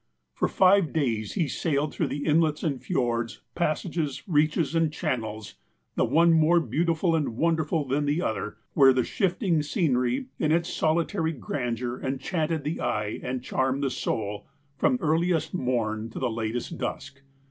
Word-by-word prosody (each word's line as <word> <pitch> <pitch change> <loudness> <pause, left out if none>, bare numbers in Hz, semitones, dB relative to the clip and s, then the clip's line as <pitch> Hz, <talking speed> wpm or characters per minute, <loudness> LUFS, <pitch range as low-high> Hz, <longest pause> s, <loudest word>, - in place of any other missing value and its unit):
For - - 0
five 190 -3 +4
days 115 -9 -1
he 165 - 0
sailed 145 +1 -1
tlirough 145 0 -2
inlets 155 -1 +2
and 140 -6 -1
fjords, 120 -8 -1
pas 155 -3 0
sages, 155 -6 -3
reaches 155 -1 +2
and 165 -2 +2
channels, 110 -8 -4 0.4
the - - +2
one 165 +6 +4
more 165 +2 +5
beautiful 165 - +1
and 145 -8 -1
wonderful 160 -1 +1
than 145 +3 0
the 145 +3 +1
other, 110 - -3 0.2
where 135 -2 +6
the 125 -1 +2
shifting 180 - 0
scenery, 135 - 0
in 155 - +1
it.s 170 +1 +1
solitary 165 +1 0
grandeur, 125 -2 -3
enchanted 155 +3 -2
the 150 +3 -3
eye 105 0 -1
and 125 -1 -4
charmed 130 +2 0
the 135 - 0
soul, 105 -4 -3 0.3
from 250 - +2
earliest 165 +1 +1
morn 115 -7 -1
to - - -2
latest 115 +7 -3
dusk. 140 0 -5
150 Hz, 150 wpm, -26 LUFS, 125-165 Hz, 0.4 s, where